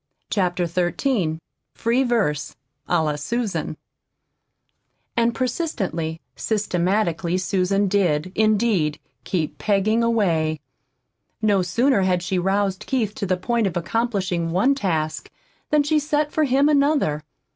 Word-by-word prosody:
CHAPTER 180 Hz, -3 st, +1 dB
XIII 175 Hz, -, 0 dB, 0.4 s
FREE 235 Hz, +3 st, +1 dB
VERSE 205 Hz, -, 0 dB, 0.3 s
A 160 Hz, -, +3 dB
LA 150 Hz, -1 st, -1 dB
SUSAN 225 Hz, +7 st, -2 dB, 1.4 s
And 235 Hz, 0 st, +2 dB
persistently, 200 Hz, -, -2 dB, 0.2 s
systematically 185 Hz, -4 st, 0 dB
Susan 195 Hz, +1 st, +1 dB
did, 185 Hz, -4 st, +1 dB
indeed, 215 Hz, -8 st, +2 dB, 0.3 s
keep 165 Hz, -5 st, -2 dB
"peggin' 215 Hz, +2 st, +2 dB
away." 170 Hz, -10 st, +1 dB, 0.8 s
No 205 Hz, -3 st, +3 dB
sooner 230 Hz, +6 st, +2 dB
had 180 Hz, -2 st, +1 dB
she 185 Hz, +1 st, 0 dB
roused 195 Hz, +1 st, 0 dB
Keith 225 Hz, -6 st, 0 dB
to 200 Hz, -, -4 dB
the 185 Hz, 0 st, +1 dB
point 230 Hz, +3 st, 0 dB
of 175 Hz, -, -3 dB
accomplishing 185 Hz, -3 st, -1 dB
one 195 Hz, +11 st, +3 dB
task 160 Hz, -, -2 dB, 0.4 s
than 300 Hz, -1 st, +3 dB
she 305 Hz, +1 st, +2 dB
set 295 Hz, 0 st, 0 dB
for 310 Hz, -, +2 dB
him 275 Hz, +2 st, +3 dB
another. 285 Hz, -, +2 dB
195 Hz, 120 wpm, -22 LUFS, 175-235 Hz, 1.4 s, A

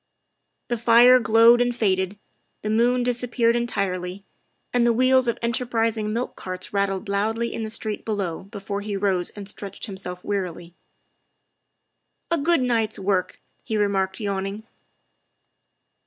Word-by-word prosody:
The 240 Hz, -, 0 dB
fire 240 Hz, +2 st, +7 dB
glowed 230 Hz, +1 st, +6 dB
and 245 Hz, 0 st, +1 dB
faded, 190 Hz, -3 st, 0 dB, 0.5 s
the 215 Hz, -, -1 dB
moon 245 Hz, +3 st, +2 dB
disappeared 240 Hz, -1 st, +1 dB
en 240 Hz, 0 st, 0 dB
tirely, 185 Hz, -2 st, -3 dB, 0.5 s
and 245 Hz, -1 st, +3 dB
the 235 Hz, 0 st, +4 dB
wheels 255 Hz, +1 st, +3 dB
of 235 Hz, -, 0 dB
enterprising 230 Hz, -2 st, 0 dB
milk 235 Hz, +3 st, -3 dB
carts 185 Hz, +1 st, -6 dB
rat 200 Hz, 0 st, +2 dB
tled 195 Hz, +2 st, -4 dB
loudly 220 Hz, +4 st, -1 dB
in -, -, -4 dB
the 220 Hz, -, -3 dB
street 215 Hz, -1 st, -3 dB
below 200 Hz, -6 st, -3 dB
before 200 Hz, 0 st, -5 dB
he 205 Hz, -1 st, -3 dB
rose 190 Hz, -3 st, 0 dB
and 205 Hz, -2 st, -9 dB
stretched 200 Hz, -1 st, -6 dB
himself 190 Hz, -3 st, -7 dB
wearily. 175 Hz, -4 st, -4 dB, 1.6 s
"A 335 Hz, -, +2 dB
good 325 Hz, -1 st, +2 dB
night's 225 Hz, -3 st, 0 dB
work," 190 Hz, -1 st, -1 dB, 0.2 s
he 220 Hz, -, -2 dB
remarked, 195 Hz, -2 st, 0 dB
yawning. 200 Hz, 0 st, -3 dB
215 Hz, 140 wpm, -24 LUFS, 195-235 Hz, 1.6 s, fire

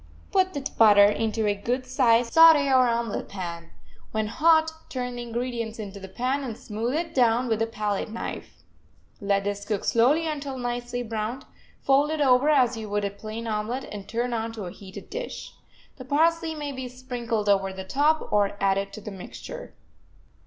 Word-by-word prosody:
Put 375 Hz, -3 st, +2 dB
the 285 Hz, -, -2 dB, 0.2 s
butter 205 Hz, -2 st, +8 dB
into 220 Hz, +1 st, 0 dB
a 205 Hz, -, +2 dB
good 245 Hz, +6 st, -2 dB
sized 240 Hz, -2 st, +2 dB
saute 325 Hz, -3 st, +8 dB
or 255 Hz, -2 st, +5 dB
omelet 235 Hz, -2 st, -2 dB
pan; 170 Hz, -4 st, -6 dB, 0.4 s
when 220 Hz, 0 st, -1 dB
hot, 320 Hz, +6 st, +3 dB, 0.2 s
turn 250 Hz, -1 st, -4 dB
the -, -, -4 dB
ingredients 235 Hz, -1 st, -4 dB
into 205 Hz, -2 st, -7 dB
the 190 Hz, -, -9 dB
pan, 255 Hz, +8 st, -2 dB
and 230 Hz, -4 st, -5 dB
smooth 230 Hz, +5 st, -3 dB
it 330 Hz, 0 st, -2 dB
down 245 Hz, -1 st, +3 dB
with 225 Hz, -1 st, 0 dB
a 225 Hz, -, +2 dB
pallet 210 Hz, -2 st, -2 dB
knife. 225 Hz, -, -7 dB, 0.6 s
Let 200 Hz, -1 st, +1 dB
this 200 Hz, 0 st, -3 dB
cook 205 Hz, -1 st, -2 dB
slowly 275 Hz, +8 st, +3 dB
until 285 Hz, -4 st, -4 dB
nicely 245 Hz, 0 st, -3 dB
browned; 225 Hz, +3 st, -4 dB, 0.4 s
fold 275 Hz, +2 st, +3 dB
it 315 Hz, 0 st, -2 dB
over 265 Hz, 0 st, +4 dB
as 255 Hz, -5 st, +4 dB
you 220 Hz, -2 st, -6 dB
would 205 Hz, 0 st, -1 dB
a 200 Hz, -, -2 dB
plain 215 Hz, +3 st, -7 dB
omelet, 225 Hz, +4 st, -2 dB
and 200 Hz, -2 st, -7 dB
turn 240 Hz, +2 st, -1 dB
onto 225 Hz, -2 st, -3 dB
a 175 Hz, -, -6 dB
heated 195 Hz, +1 st, -11 dB
dish. -, -, -6 dB, 0.4 s
The 255 Hz, -, -8 dB
parsley 320 Hz, +3 st, +2 dB
may 295 Hz, -2 st, -4 dB
be 260 Hz, -2 st, -5 dB
sprinkled 245 Hz, -4 st, -4 dB
over 195 Hz, -1 st, +2 dB
the 190 Hz, 0 st, -7 dB
top, 300 Hz, +8 st, +1 dB
or 205 Hz, -1 st, +2 dB
added 195 Hz, 0 st, +1 dB
to 215 Hz, -, -8 dB
the 210 Hz, -, -7 dB
mixture. 190 Hz, -2 st, -9 dB
235 Hz, 180 wpm, -26 LUFS, 210-265 Hz, 0.6 s, butter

